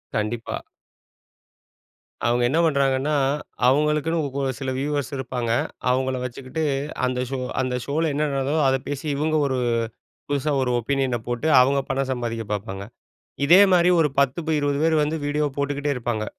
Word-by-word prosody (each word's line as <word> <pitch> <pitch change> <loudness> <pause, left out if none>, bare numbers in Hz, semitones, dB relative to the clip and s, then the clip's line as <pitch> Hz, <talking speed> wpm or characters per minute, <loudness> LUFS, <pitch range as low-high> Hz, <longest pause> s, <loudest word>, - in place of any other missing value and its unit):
கண்டிப்பா. 110 +2 -2 1.7
அவுங்க 120 +1 +2
என்ன 155 +5 +2
பண்றாங்கன்னா, 140 -1 +1 0.5
அவங்களுக்குன்னு 150 +4 +2 0.2
கொ 140 - -1 0.2
சில 135 -1 -3
வியூவர்ஸ் 145 0 -2
இருப்பாங்க. 125 -3 -3 0.4
அவங்கள 130 +1 +1
வச்சுக்கிட்டு 130 +5 -4 0.4
அந்த 125 0 -1
ஷோ 135 - -3 0.2
அந்த 130 -1 -1
ஷோல 160 +3 0
என்ன 150 +2 0
நடக்குதோ 135 +2 0
அத 135 0 +3
பேசி 145 +1 -4
இவங்க 155 +2 0
ஒரு 130 -1 -1 0.7
புதுசா 145 +1 0
ஒரு 125 - 0
ஒப்பீனியன 130 0 0
போட்டு 120 +5 -2
அவங்க 140 +2 +3
பணம் 135 0 -1
சம்பாதிக்க 115 -2 -3
பார்ப்பாங்க. 100 -1 -4 0.6
இதே 175 +7 +8
மாரி 175 0 +5
ஒரு 155 -2 +3
10 140 +2 +2
ப - - -1
20 145 -1 0
பேர் 160 0 +3
வந்து 150 +2 -1
வீடியோ 150 +1 0
போட்டுக்கிட்டே 145 0 -1
இருப்பாங்க. 120 -3 -2
135 Hz, 145 wpm, -23 LUFS, 125-150 Hz, 1.7 s, இதே